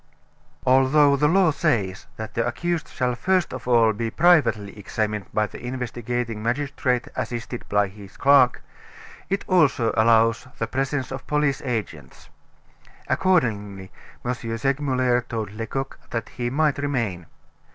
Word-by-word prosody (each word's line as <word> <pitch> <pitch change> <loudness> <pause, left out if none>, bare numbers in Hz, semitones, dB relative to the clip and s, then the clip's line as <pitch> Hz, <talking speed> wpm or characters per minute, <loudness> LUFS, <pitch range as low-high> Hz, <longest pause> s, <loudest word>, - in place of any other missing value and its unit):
Although 135 +3 +5
the 150 +2 +2
law 180 0 +4
says 110 - -1
that 110 -1 -6
the 115 - 0
accused 170 +6 -2
shall 125 -1 -1
first 180 +7 0
of 130 -1 -7
all 115 -3 +4
be 115 +2 -3
privately 140 - +3
examined 105 0 -3
by 105 - +1
the 105 - -10
investigating 120 -2 -3
magistrate 125 +1 -1
assisted 120 0 -5
by 105 0 +2
his 100 0 -13
clerk, 135 -2 +4 0.7
it 195 +1 -1
also 145 -10 +3
allows 115 +1 +3
the 115 - -1
presence 135 +2 -2
of 135 - -7
police 150 -2 +1
agents. 105 - -5 0.8
Accordingly, 105 - 0 0.3
M. 125 - 0 0.2
Segmuller 130 -1 +1
told 110 -4 -5
Lecoq 115 +5 -5
that 115 -2 -4
he 120 -1 -3
might 150 +2 +1
remain. 115 - -2
125 Hz, 130 wpm, -23 LUFS, 110-140 Hz, 0.8 s, Although